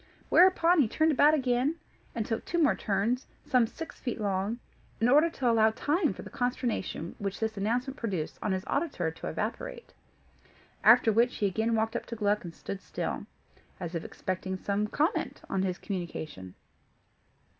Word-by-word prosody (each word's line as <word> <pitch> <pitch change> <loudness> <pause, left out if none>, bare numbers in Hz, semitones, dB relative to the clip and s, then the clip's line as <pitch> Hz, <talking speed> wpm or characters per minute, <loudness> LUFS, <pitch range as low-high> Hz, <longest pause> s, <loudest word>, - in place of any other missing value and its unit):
Whereupon 360 -1 +6
he 270 - +5
turned 315 +8 +2
about 295 +2 +5
again, 260 +2 +1 0.4
and 225 -2 -1
took 225 +1 -2
two 345 - -2
more 310 -3 +4
turns, 215 +6 -1 0.2
some 250 -4 +3
six 325 +7 -9
feet 245 -4 -3
long, 200 +2 -1 0.4
in 225 - +3
order 300 +6 +6
to 265 -6 -2
allow 225 -2 +5
time 300 - +1
for - - -8
the - - -10
consternation 245 -9 -2
which 200 -1 -3
this 220 -1 -1
announcement 245 +7 -1
produced 190 - -3
in 210 - -1
his 190 0 -1
auditor 280 - -1
to 160 - -8
evaporate. - - -4 0.9
After 225 +1 +7
which, 235 +3 +3
he 205 - 0
again 220 +4 +1
walked 220 0 0
up - - -3
to 235 - -5
Gluck 210 -1 +1
and 170 -2 -8
stood 195 -1 -6
still, - - -4 0.5
as 175 -2 -5
if 165 - -3
expecting 185 0 -4
some 205 +2 -1
comment 310 - -1
on 195 - +1
his 185 -1 -1
communication. 160 - -6
225 Hz, 170 wpm, -29 LUFS, 195-270 Hz, 0.9 s, After